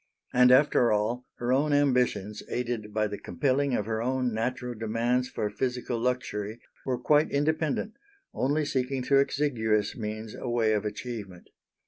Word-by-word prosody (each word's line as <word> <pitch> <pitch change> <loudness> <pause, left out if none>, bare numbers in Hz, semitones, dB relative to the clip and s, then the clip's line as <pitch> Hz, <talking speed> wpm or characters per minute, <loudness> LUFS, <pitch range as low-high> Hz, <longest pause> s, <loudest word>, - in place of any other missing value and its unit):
And 125 0 +6
after 130 -2 +5
all, 110 +4 0
her 120 +1 0
own 145 +3 +2
ambitions, 125 -7 +1
aided 120 -3 -3
by 110 0 +1
the 105 -1 -4
compelling 140 -1 0
of 105 - -1
her 110 0 -2
own 130 0 0
natural 125 +2 -2
demands 120 +3 0
for 105 - -2
physical 125 +1 -2
luxury, 115 -3 -2 0.3
were 130 -1 0
quite 150 +5 +3
independent, 155 +7 0 0.4
only 145 +3 0
seeking 130 -1 -1
through 135 +2 +4
exiguous 115 -8 0
means 110 -2 -5
a 125 - -5
way 115 -2 +2
of 105 0 0
achievement. 105 -4 -6
125 Hz, 150 wpm, -28 LUFS, 110-130 Hz, 0.4 s, And